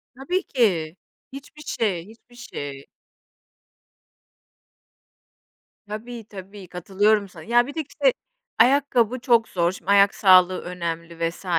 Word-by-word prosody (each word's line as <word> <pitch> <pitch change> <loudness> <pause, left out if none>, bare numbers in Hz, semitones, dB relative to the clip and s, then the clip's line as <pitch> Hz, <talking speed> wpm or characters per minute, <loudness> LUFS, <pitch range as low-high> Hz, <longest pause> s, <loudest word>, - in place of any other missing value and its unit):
Tabii 355 +9 -2
ki, 180 - 0 0.4
hiçbir 280 +2 -11
şey, 195 - -2
hiçbir 230 +2 -18
şey. 140 - -8 3.0
Tabii, 225 +3 -7
tabii, 195 0 -11
katılıyorum 200 +4 +1
sana. 165 -3 -13
Ya, 240 +2 +3
bir 285 - -7
de, 320 - -1
işte, 395 - +1 0.5
ayakkabı 255 -1 +3
çok 235 -2 +3
zor, 175 -1 +1
şimdi, 190 +1 -4
ayak 200 0 +5
sağlığı 185 -2 +5
önemli 170 -1 -4
vs. 175 - -13
205 Hz, 115 wpm, -23 LUFS, 180-240 Hz, 3.0 s, ayak